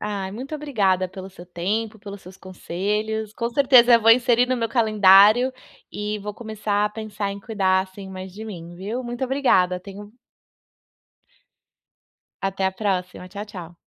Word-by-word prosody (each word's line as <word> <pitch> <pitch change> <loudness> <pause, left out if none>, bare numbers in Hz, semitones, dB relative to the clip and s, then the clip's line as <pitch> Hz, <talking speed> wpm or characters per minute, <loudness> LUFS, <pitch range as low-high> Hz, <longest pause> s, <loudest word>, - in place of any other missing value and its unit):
Ai, 200 -2 -4
muito 260 +8 -7
obrigada 205 -11 0
pelo 190 +1 -10
seu 180 -2 -13
tempo, 210 +6 -3
pelos 200 -1 -10
seus 185 +1 -13
conselhos. 210 +4 -4
Com 235 +1 -3
certeza 250 -2 +6
eu 230 - +5
vou 225 - +6
inserir 245 0 +4
no 255 - 0
meu 230 -1 -2
calendário 215 +1 +5 0.4
e 210 0 -3
vou 210 0 -7
começar 215 -2 -2
a - - +1
pensar 210 -2 -5
em 200 - -6
cuidar, 195 -3 +1
assim, 190 +1 -9
mais 185 0 -8
de 215 +4 -9
mim, 175 -5 -9
viu. 210 +8 -5
Muito 240 +2 -4
obrigada, 245 -10 +2
tenha 195 +2 -10
um 205 +1 -14 2.3
Até 195 0 -2
a 190 - -1
próxima. 185 -2 -3
Tchau, 200 +2 -7
tchau. 175 -5 -10
205 Hz, 165 wpm, -22 LUFS, 190-225 Hz, 2.3 s, certeza